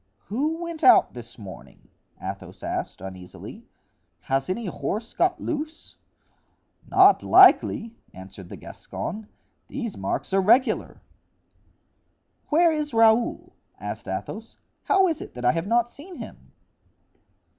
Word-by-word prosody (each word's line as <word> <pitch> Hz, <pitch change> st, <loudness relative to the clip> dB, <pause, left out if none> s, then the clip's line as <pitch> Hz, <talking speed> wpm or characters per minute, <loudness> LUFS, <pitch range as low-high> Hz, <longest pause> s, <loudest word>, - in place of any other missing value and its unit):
"Who 305 Hz, -, -1 dB
went 335 Hz, -2 st, -6 dB
out 375 Hz, -, +6 dB
this 120 Hz, 0 st, -10 dB
morning?" 95 Hz, -6 st, -12 dB, 0.3 s
Athos -, -, -8 dB
asked, -, -, -4 dB
uneasily. 95 Hz, -1 st, -10 dB, 0.5 s
"Has 135 Hz, +2 st, -1 dB
any 225 Hz, +5 st, -2 dB
horse 200 Hz, -, -4 dB
got 365 Hz, +1 st, +1 dB
loose?" 310 Hz, +1 st, -5 dB, 0.9 s
"Not -, -, +6 dB
likely," 225 Hz, +1 st, +5 dB, 0.2 s
answered 95 Hz, 0 st, -12 dB
the -, -, -8 dB
Gascon; 215 Hz, +2 st, -7 dB, 0.4 s
"these 240 Hz, -6 st, -5 dB
marks 95 Hz, -, -3 dB
are 195 Hz, -, +4 dB
regular." 240 Hz, +7 st, +2 dB, 1.5 s
"Where 335 Hz, +2 st, +4 dB
is 300 Hz, -5 st, -3 dB
Raoul?" 225 Hz, +1 st, +3 dB, 0.3 s
asked -, -, -6 dB
Athos; -, -, -6 dB, 0.3 s
"how 385 Hz, -1 st, +4 dB
is 320 Hz, -3 st, -2 dB
it -, -, -10 dB
that 125 Hz, 0 st, -5 dB
I 125 Hz, -, +6 dB
have 165 Hz, +5 st, -3 dB
not 235 Hz, +2 st, +2 dB
seen 320 Hz, +9 st, -12 dB
him?" -, -, -11 dB
225 Hz, 125 wpm, -25 LUFS, -, 1.5 s, out